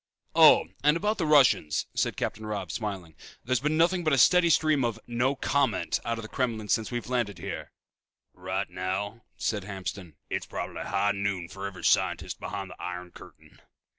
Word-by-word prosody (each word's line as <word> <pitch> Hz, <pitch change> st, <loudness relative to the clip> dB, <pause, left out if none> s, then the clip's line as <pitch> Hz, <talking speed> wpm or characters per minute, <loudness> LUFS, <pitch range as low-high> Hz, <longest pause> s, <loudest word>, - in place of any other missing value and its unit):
"Oh, -, -, +7 dB, 0.2 s
and 150 Hz, +2 st, +4 dB
about 210 Hz, +4 st, -1 dB
the 165 Hz, -, 0 dB
Russians," 135 Hz, -, +4 dB
said -, -, -1 dB
Captain 110 Hz, -, -3 dB
Robb, 100 Hz, -5 st, -4 dB
smiling. 95 Hz, -7 st, -5 dB, 0.3 s
"There's 130 Hz, 0 st, +1 dB
been 150 Hz, +3 st, 0 dB
nothing 175 Hz, +2 st, +3 dB
but 155 Hz, -2 st, +2 dB
a -, -, +4 dB
steady 180 Hz, +5 st, +6 dB
stream 155 Hz, -4 st, +3 dB
of 115 Hz, -2 st, -1 dB
'no 120 Hz, +3 st, 0 dB
comment' 135 Hz, -7 st, 0 dB
out 115 Hz, 0 st, -2 dB
of 115 Hz, -, -6 dB
the -, -, -6 dB
Kremlin 110 Hz, -4 st, -2 dB
since 110 Hz, -, +1 dB
we 120 Hz, -, -2 dB
landed 120 Hz, -6 st, -2 dB
here." -, -, -6 dB, 0.6 s
"Right 95 Hz, +2 st, -3 dB
now," 100 Hz, +5 st, -4 dB
said 105 Hz, -3 st, -1 dB
Hamston, 95 Hz, -4 st, -6 dB
"it's -, -, -3 dB
probably -, -, -5 dB
high 100 Hz, +1 st, +1 dB
noon 100 Hz, -4 st, -2 dB
for 95 Hz, +1 st, -5 dB
every 90 Hz, -3 st, -9 dB
scientist -, -, +1 dB
behind 100 Hz, -2 st, -5 dB
the -, -, -12 dB
iron 90 Hz, 0 st, -6 dB
curtain." -, -, -16 dB
110 Hz, 180 wpm, -28 LUFS, 95-135 Hz, 0.6 s, Oh